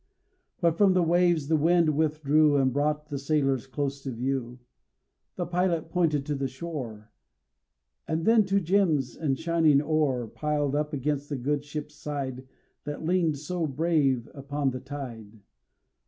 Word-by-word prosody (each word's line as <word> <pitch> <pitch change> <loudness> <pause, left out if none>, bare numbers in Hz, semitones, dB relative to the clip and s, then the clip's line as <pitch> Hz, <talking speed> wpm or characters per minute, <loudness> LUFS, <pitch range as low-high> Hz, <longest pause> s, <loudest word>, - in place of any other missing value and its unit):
But 170 -1 +2
from 200 -2 +5
the 180 -1 +3
waves 170 -3 +2
the 160 - +3
wind 165 0 +3
withdrew 155 -1 +3
And 130 -2 +2
brought 150 +2 -1
the 140 -2 -3
sailors 135 -3 0
close 140 0 -3
to 135 - -5
view. 125 0 -3 0.8
The 175 - -2
pilot 175 -1 0
pointed 155 -6 +1
to 150 - -2
the 135 -1 -1
shore, 130 -7 -7 1.0
And 160 +1 -1
then 225 -1 +5
to 195 +1 +2
gems 165 -8 +1
and 140 -4 -1
shining 165 -3 +3
ore 145 -5 0
Piled 150 +2 -1
up 150 0 -1
against 145 0 -2
the 145 - -2
good 145 +3 -1
ship's 150 0 -6
side 135 -3 -5 0.4
That 145 +2 -5
leaned 165 -3 +1
so 165 +3 -2
brave 140 -4 +1
upon 140 0 -2
the 130 - -5
tide. 120 -6 -8
150 Hz, 155 wpm, -27 LUFS, 135-160 Hz, 1.0 s, from